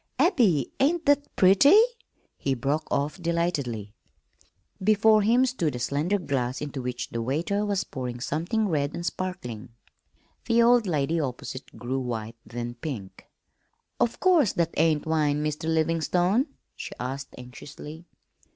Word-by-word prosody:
Abby, 200 Hz, -, +3 dB
ain't 315 Hz, +4 st, +2 dB
that 285 Hz, 0 st, +3 dB
pretty?" 195 Hz, -, +6 dB, 0.6 s
he 135 Hz, -1 st, -1 dB
broke 140 Hz, +5 st, -1 dB
off 145 Hz, +6 st, -1 dB
delightedly. 145 Hz, -, -2 dB, 0.9 s
Before 215 Hz, +1 st, +5 dB
him 235 Hz, +5 st, +4 dB
stood 175 Hz, -, -1 dB
a -, -, -4 dB
slender 150 Hz, -, 0 dB
glass 135 Hz, -8 st, -2 dB
into 145 Hz, -2 st, -5 dB
which 125 Hz, 0 st, -4 dB
the 115 Hz, -, -3 dB
waiter 165 Hz, -, -1 dB
was 200 Hz, -2 st, 0 dB
pouring 125 Hz, -6 st, -6 dB
something 170 Hz, -, -1 dB
red 145 Hz, -4 st, -1 dB
and 170 Hz, -, -5 dB
sparkling. 145 Hz, -, -5 dB, 0.7 s
The 230 Hz, 0 st, +4 dB
old 240 Hz, -2 st, +4 dB
lady 160 Hz, 0 st, 0 dB
opposite 130 Hz, -1 st, -5 dB
grew 130 Hz, +2 st, -2 dB
white, 115 Hz, -3 st, -4 dB
then 120 Hz, +1 st, -5 dB
pink. 110 Hz, -11 st, -7 dB, 0.7 s
"Of 235 Hz, -, 0 dB
course 340 Hz, -, +4 dB
that 170 Hz, -1 st, 0 dB
ain't 155 Hz, -1 st, +2 dB
wine, 150 Hz, -2 st, +1 dB
Mr. 155 Hz, +2 st, -2 dB
Livingstone?" 175 Hz, -, +1 dB, 0.3 s
she -, -, -7 dB
asked 135 Hz, +3 st, -5 dB
anxiously. 150 Hz, +6 st, -10 dB
155 Hz, 135 wpm, -26 LUFS, 130-200 Hz, 0.9 s, pretty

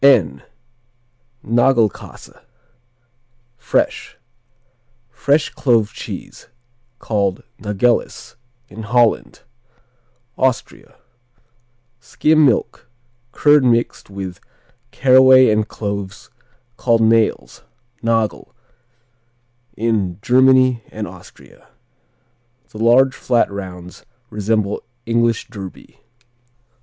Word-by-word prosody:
N 95 Hz, -, +4 dB, 1.0 s
Nagelkassa 120 Hz, -1 st, -1 dB, 1.1 s
(Fresh), -, -, -2 dB, 0.9 s
Fresh 145 Hz, +5 st, 0 dB
Clove 115 Hz, -5 st, +1 dB
Cheese, -, -, -9 dB, 0.5 s
called 100 Hz, -5 st, -2 dB, 0.2 s
Nageles 105 Hz, +3 st, -1 dB, 0.3 s
in 110 Hz, 0 st, -10 dB
Holland 120 Hz, +1 st, 0 dB, 1.0 s
Austria 130 Hz, -2 st, -2 dB, 1.0 s
Skim 155 Hz, +4 st, +1 dB
milk; 120 Hz, -2 st, 0 dB, 0.4 s
curd 145 Hz, +1 st, +3 dB
mixed 120 Hz, -4 st, 0 dB
with 95 Hz, -2 st, -7 dB, 0.5 s
caraway 130 Hz, -1 st, +5 dB
and 105 Hz, 0 st, 0 dB
cloves 100 Hz, -2 st, -6 dB, 0.5 s
called 115 Hz, -2 st, +1 dB
nails, 110 Hz, 0 st, +1 dB, 0.4 s
nagel, 115 Hz, -3 st, -2 dB, 1.2 s
in 105 Hz, -6 st, -1 dB
Germany 130 Hz, -1 st, +3 dB
and -, -, -5 dB
Austria. -, -, -16 dB, 1.0 s
The 110 Hz, -, -11 dB
large 125 Hz, +4 st, +4 dB
flat 120 Hz, -6 st, 0 dB
rounds 90 Hz, -3 st, -9 dB, 0.3 s
resemble 105 Hz, 0 st, -1 dB, 0.2 s
English 115 Hz, 0 st, 0 dB
Derby. 100 Hz, -5 st, -11 dB
115 Hz, 75 wpm, -18 LUFS, 105-130 Hz, 1.2 s, caraway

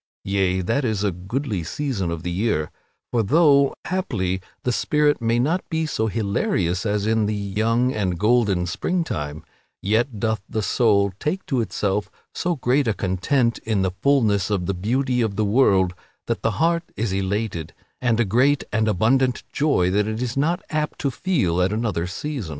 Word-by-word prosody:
Yea; 95 Hz, -1 st, +1 dB
that 115 Hz, +10 st, 0 dB
is 110 Hz, -4 st, -1 dB
a 100 Hz, -, +2 dB
goodly 100 Hz, -, -3 dB
season 105 Hz, -, -2 dB
of 85 Hz, -1 st, -4 dB
the 90 Hz, -, -3 dB
year, 90 Hz, -5 st, 0 dB, 0.4 s
for 120 Hz, -, +2 dB
though, 140 Hz, -, +4 dB
haply, 100 Hz, -, -1 dB, 0.2 s
the 125 Hz, -, +1 dB
spirit 150 Hz, +3 st, +1 dB
may 115 Hz, +1 st, +1 dB
not 155 Hz, +9 st, +1 dB
be 160 Hz, -1 st, 0 dB
so 110 Hz, -7 st, -1 dB
hilarious 100 Hz, -3 st, 0 dB
as 105 Hz, 0 st, 0 dB
in 110 Hz, -1 st, +2 dB
the 105 Hz, -, -1 dB
young 110 Hz, +5 st, 0 dB
and 95 Hz, -5 st, -1 dB
golden 105 Hz, -3 st, +2 dB
springtime, 90 Hz, -, -2 dB, 0.4 s
yet 110 Hz, +3 st, 0 dB
doth 110 Hz, -2 st, 0 dB
the 110 Hz, -, -2 dB
soul 100 Hz, -1 st, +2 dB
take 180 Hz, +6 st, -2 dB
to 135 Hz, -9 st, 0 dB
itself 105 Hz, -2 st, -1 dB, 0.2 s
so 175 Hz, -1 st, -1 dB
great 135 Hz, 0 st, +1 dB
a 110 Hz, -, +1 dB
content 115 Hz, +7 st, 0 dB
in 110 Hz, -4 st, -1 dB
the 95 Hz, -, 0 dB
fulness 110 Hz, -9 st, +2 dB
of 100 Hz, -4 st, 0 dB
the 100 Hz, -, -1 dB
beauty 125 Hz, +7 st, 0 dB
of 110 Hz, -3 st, -1 dB
the 110 Hz, +1 st, +1 dB
world, 100 Hz, -5 st, +3 dB, 0.3 s
that -, -, -2 dB
the -, -, 0 dB
heart 170 Hz, +1 st, +2 dB
is 110 Hz, -3 st, -1 dB
elated 95 Hz, -4 st, -2 dB, 0.3 s
with 120 Hz, -2 st, +1 dB
a 120 Hz, -, +3 dB
great 130 Hz, +8 st, +3 dB
and 110 Hz, 0 st, +2 dB
abundant 120 Hz, +6 st, +2 dB
joy 140 Hz, -12 st, +2 dB
that 105 Hz, +2 st, +1 dB
it 110 Hz, 0 st, -3 dB
is 125 Hz, -1 st, -2 dB
not 160 Hz, +6 st, 0 dB
apt 155 Hz, -1 st, -1 dB
to 140 Hz, -, -1 dB
feel 120 Hz, -, 0 dB
at 90 Hz, +2 st, +2 dB
another 105 Hz, -6 st, -1 dB
season. 120 Hz, -, -4 dB
110 Hz, 180 wpm, -23 LUFS, 95-130 Hz, 0.4 s, though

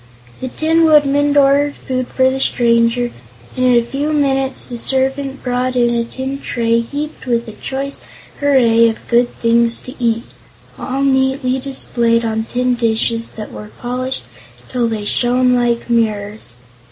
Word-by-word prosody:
The 260 Hz, -, -4 dB
Tin 320 Hz, +5 st, +1 dB
Woodman 290 Hz, -1 st, +4 dB
ordered 285 Hz, +1 st, +3 dB
food 255 Hz, -1 st, -3 dB
for 260 Hz, 0 st, +2 dB
the 265 Hz, -, -3 dB
stranger, 235 Hz, -1 st, +2 dB, 0.4 s
and 255 Hz, -, -1 dB
in 250 Hz, -1 st, +4 dB
a 235 Hz, -1 st, +3 dB
few 285 Hz, +5 st, -2 dB
minutes 270 Hz, -2 st, 0 dB
the 240 Hz, -2 st, -7 dB
servant 270 Hz, +2 st, -1 dB
brought 250 Hz, 0 st, -1 dB
in 240 Hz, -1 st, +2 dB
a 235 Hz, 0 st, +1 dB
tin 265 Hz, +3 st, -5 dB
tray 230 Hz, -3 st, 0 dB
heaped 285 Hz, +4 st, -5 dB
with 235 Hz, -1 st, 0 dB
a -, -, -6 dB
choice 270 Hz, +6 st, -5 dB, 0.4 s
array 235 Hz, -5 st, +4 dB
of 225 Hz, -, -7 dB
good 240 Hz, 0 st, +3 dB
things 235 Hz, 0 st, +2 dB
to 255 Hz, -, -9 dB
eat, 230 Hz, 0 st, +1 dB, 0.6 s
all 270 Hz, +1 st, -2 dB
neatly 265 Hz, -1 st, +1 dB
displayed 235 Hz, -3 st, 0 dB
on 220 Hz, 0 st, -1 dB
tin 250 Hz, +1 st, 0 dB
dishes 230 Hz, -1 st, 0 dB
that 215 Hz, -, -7 dB
were 210 Hz, -, -9 dB
polished 255 Hz, +2 st, -3 dB, 0.5 s
till 245 Hz, -2 st, 0 dB
they 220 Hz, -2 st, -3 dB
shone 250 Hz, +3 st, +2 dB
like 240 Hz, -1 st, 0 dB
mirrors. 215 Hz, -, -1 dB
250 Hz, 155 wpm, -17 LUFS, 230-270 Hz, 0.6 s, Woodman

